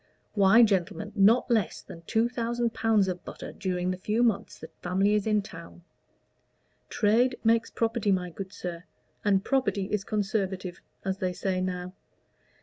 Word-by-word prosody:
"Why, 205 Hz, +3 st, +6 dB
gentlemen, 205 Hz, 0 st, 0 dB
not 225 Hz, +5 st, +4 dB
less 220 Hz, -5 st, +1 dB
than 165 Hz, -, -11 dB
two 225 Hz, +1 st, +2 dB
thousand 235 Hz, -1 st, -2 dB
pounds 220 Hz, -3 st, +2 dB
of 180 Hz, -2 st, -4 dB
butter -, -, -8 dB
during 180 Hz, -2 st, -2 dB
the 185 Hz, -, -3 dB
few 215 Hz, +5 st, +1 dB
months 225 Hz, -2 st, 0 dB
the -, -, -10 dB
family 190 Hz, +3 st, +1 dB
is 210 Hz, 0 st, +1 dB
in 210 Hz, -2 st, +2 dB
town! 170 Hz, -2 st, -11 dB, 1.1 s
Trade 240 Hz, +4 st, +2 dB
makes 225 Hz, 0 st, +3 dB
property, 225 Hz, -2 st, 0 dB
my 180 Hz, -2 st, 0 dB
good 190 Hz, +2 st, -7 dB
sir, 175 Hz, -3 st, -6 dB, 0.4 s
and 195 Hz, -2 st, +2 dB
property 260 Hz, -7 st, +1 dB
is 210 Hz, -2 st, 0 dB
conservative, 195 Hz, -4 st, -2 dB, 0.2 s
as 190 Hz, 0 st, -2 dB
they 185 Hz, -1 st, -1 dB
say 185 Hz, 0 st, -1 dB
now. 180 Hz, 0 st, -3 dB
200 Hz, 155 wpm, -28 LUFS, 185-225 Hz, 1.1 s, Why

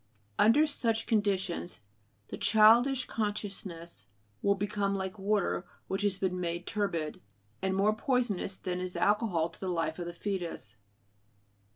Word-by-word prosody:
Under 240 Hz, +9 st, +6 dB
such 230 Hz, -7 st, 0 dB
conditions 195 Hz, -, -1 dB, 0.5 s
the -, -, -5 dB
childish 230 Hz, +5 st, +5 dB
consciousness 195 Hz, -, -4 dB, 0.3 s
will 200 Hz, 0 st, +3 dB
become 200 Hz, 0 st, -1 dB
like 190 Hz, +1 st, -4 dB
water 195 Hz, -2 st, 0 dB, 0.2 s
which 190 Hz, +1 st, -2 dB
has 205 Hz, -2 st, +2 dB
been 185 Hz, -2 st, -1 dB
made 175 Hz, 0 st, -3 dB
turbid, 170 Hz, -7 st, -2 dB, 0.4 s
and 190 Hz, 0 st, 0 dB
more 205 Hz, +2 st, +3 dB
poisonous 220 Hz, -6 st, 0 dB
than 180 Hz, -1 st, -3 dB
is 185 Hz, 0 st, -4 dB
alcohol 205 Hz, -6 st, +2 dB
to -, -, -18 dB
the 190 Hz, -, -4 dB
life 165 Hz, -2 st, -1 dB
of 175 Hz, -, -4 dB
the 175 Hz, -, -5 dB
foetus. 175 Hz, -, -4 dB
195 Hz, 140 wpm, -30 LUFS, 180-215 Hz, 0.5 s, Under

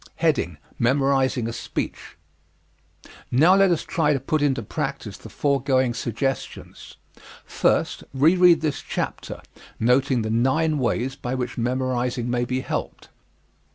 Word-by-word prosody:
Memorizing 130 Hz, -1 st, +2 dB
a 115 Hz, -, -4 dB
Speech -, -, -5 dB, 1.1 s
Now 155 Hz, +9 st, +5 dB
let 195 Hz, -1 st, +5 dB
us 170 Hz, -3 st, +1 dB
try 150 Hz, -3 st, +1 dB
to 135 Hz, -, 0 dB
put 150 Hz, +4 st, -1 dB
into 135 Hz, -5 st, +1 dB
practise -, -, -4 dB
the -, -, -12 dB
foregoing 135 Hz, -3 st, +1 dB
suggestions. 120 Hz, +3 st, -4 dB, 0.5 s
First, -, -, 0 dB
reread 170 Hz, +5 st, +5 dB
this 155 Hz, -3 st, -2 dB
chapter, -, -, -5 dB, 0.4 s
noting 125 Hz, +1 st, +2 dB
the 110 Hz, -, -2 dB
nine 145 Hz, +7 st, +1 dB
ways 130 Hz, +1 st, -1 dB
by 125 Hz, +1 st, -4 dB
which 125 Hz, -1 st, -3 dB
memorizing 125 Hz, 0 st, -1 dB
may 120 Hz, 0 st, 0 dB
be 130 Hz, +1 st, -2 dB
helped. -, -, -5 dB
130 Hz, 120 wpm, -23 LUFS, 120-145 Hz, 1.1 s, Now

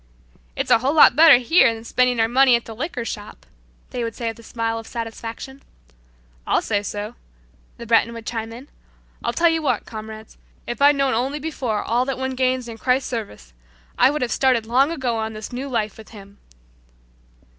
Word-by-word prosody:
"It's -, -, -2 dB
a -, -, +6 dB
whole 270 Hz, +5 st, 0 dB
lot 300 Hz, -, +7 dB
better 310 Hz, -3 st, +8 dB
here 250 Hz, +1 st, +4 dB
than 225 Hz, 0 st, -8 dB
spending 250 Hz, 0 st, +1 dB
our 225 Hz, -, +3 dB
money 255 Hz, +1 st, +5 dB
at 235 Hz, -, -2 dB
the 225 Hz, -, -8 dB
liquor 250 Hz, -2 st, -4 dB
shop," 210 Hz, -2 st, -8 dB, 0.5 s
they 245 Hz, -2 st, -3 dB
would 230 Hz, -1 st, -4 dB
say 230 Hz, -2 st, -3 dB
with 225 Hz, -, -8 dB
a -, -, -11 dB
smile 225 Hz, 0 st, -3 dB
of 225 Hz, -, -11 dB
satisfaction. 230 Hz, +3 st, -7 dB, 0.9 s
"I'll -, -, +2 dB
say 205 Hz, -2 st, 0 dB
so," 205 Hz, +2 st, -5 dB, 0.6 s
the 235 Hz, -, -9 dB
Breton 230 Hz, 0 st, +3 dB
would 230 Hz, -1 st, -9 dB
chime 225 Hz, -1 st, -4 dB
in. 245 Hz, +5 st, -11 dB, 0.6 s
"I'll -, -, 0 dB
tell 340 Hz, -, +3 dB
you 325 Hz, 0 st, 0 dB
what, 255 Hz, -7 st, -1 dB
comrades, 220 Hz, 0 st, -10 dB, 0.3 s
if 240 Hz, +3 st, -6 dB
I'd 290 Hz, +1 st, +6 dB
known 275 Hz, -1 st, +1 dB
only 260 Hz, +6 st, -1 dB
before 270 Hz, -8 st, -3 dB
all 240 Hz, +2 st, +1 dB
that 270 Hz, -1 st, -3 dB
one 260 Hz, 0 st, -3 dB
gains 255 Hz, -1 st, 0 dB
in 225 Hz, -1 st, -9 dB
Christ's 260 Hz, +3 st, 0 dB
service, 150 Hz, -, -6 dB, 0.4 s
I -, -, +5 dB
would 295 Hz, -1 st, -1 dB
have 240 Hz, -, -2 dB
started 255 Hz, -4 st, +2 dB
long 255 Hz, +5 st, +3 dB
ago 260 Hz, -8 st, -2 dB
on 220 Hz, 0 st, -3 dB
this 215 Hz, +3 st, -8 dB
new 265 Hz, +3 st, -5 dB
life 215 Hz, -4 st, -2 dB
with 220 Hz, -, -13 dB
Him." 200 Hz, -2 st, -14 dB
235 Hz, 200 wpm, -21 LUFS, 225-265 Hz, 0.9 s, better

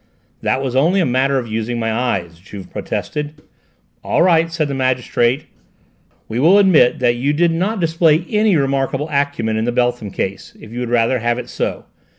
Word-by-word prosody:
"That 135 Hz, -, 0 dB
was 130 Hz, -2 st, -3 dB
only 165 Hz, +9 st, +3 dB
a 180 Hz, -, +2 dB
matter 135 Hz, +2 st, +1 dB
of 125 Hz, -, -2 dB
using 115 Hz, +2 st, -3 dB
my 115 Hz, -1 st, -1 dB
eyes," 95 Hz, -9 st, -2 dB
Juve 95 Hz, +1 st, -11 dB
protested. 150 Hz, 0 st, -4 dB, 0.7 s
"All -, -, +2 dB
right," 165 Hz, -2 st, +3 dB
said 160 Hz, -2 st, -1 dB
the 140 Hz, -, -4 dB
magistrate, 130 Hz, 0 st, 0 dB, 0.8 s
"we 115 Hz, +2 st, -3 dB
will 170 Hz, +9 st, +5 dB
admit 185 Hz, -11 st, +4 dB
that 120 Hz, -1 st, +1 dB
you 140 Hz, +4 st, 0 dB
did 170 Hz, +2 st, +2 dB
not 190 Hz, +6 st, -1 dB
display 165 Hz, -1 st, +2 dB
any 210 Hz, -2 st, +2 dB
remarkable 135 Hz, +1 st, -1 dB
acumen 140 Hz, -6 st, -1 dB
in 110 Hz, -, -1 dB
the 120 Hz, -, 0 dB
Beltham 120 Hz, -3 st, -1 dB
case, 95 Hz, 0 st, -5 dB
if 110 Hz, -, -13 dB
you 120 Hz, -, -5 dB
would 125 Hz, -1 st, -3 dB
rather 120 Hz, +1 st, +2 dB
have 120 Hz, +1 st, 0 dB
it 125 Hz, -, -7 dB
so. -, -, -3 dB
130 Hz, 185 wpm, -18 LUFS, 120-160 Hz, 0.8 s, will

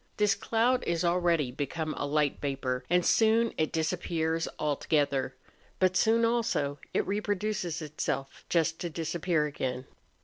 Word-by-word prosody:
Tliis 210 Hz, -1 st, +2 dB
cloud 245 Hz, +3 st, +2 dB
is 170 Hz, 0 st, 0 dB
already 170 Hz, -6 st, +2 dB
become 155 Hz, +4 st, -3 dB
a -, -, -2 dB
light 150 Hz, -1 st, +1 dB
vapour, 135 Hz, -3 st, -2 dB
and 180 Hz, 0 st, +3 dB
soon 225 Hz, +1 st, +3 dB
it 155 Hz, -, 0 dB
disappears 165 Hz, 0 st, -1 dB
altogether. 145 Hz, -3 st, 0 dB, 0.4 s
But 185 Hz, -1 st, +2 dB
soon 230 Hz, +3 st, +4 dB
also 230 Hz, -12 st, 0 dB
it -, -, 0 dB
reproduces 205 Hz, -4 st, -2 dB
itself 140 Hz, -2 st, -4 dB
just 165 Hz, -1 st, +1 dB
to 175 Hz, -, -3 dB
disappear 165 Hz, 0 st, 0 dB
again. 130 Hz, -3 st, -3 dB
165 Hz, 135 wpm, -29 LUFS, 145-190 Hz, 0.4 s, soon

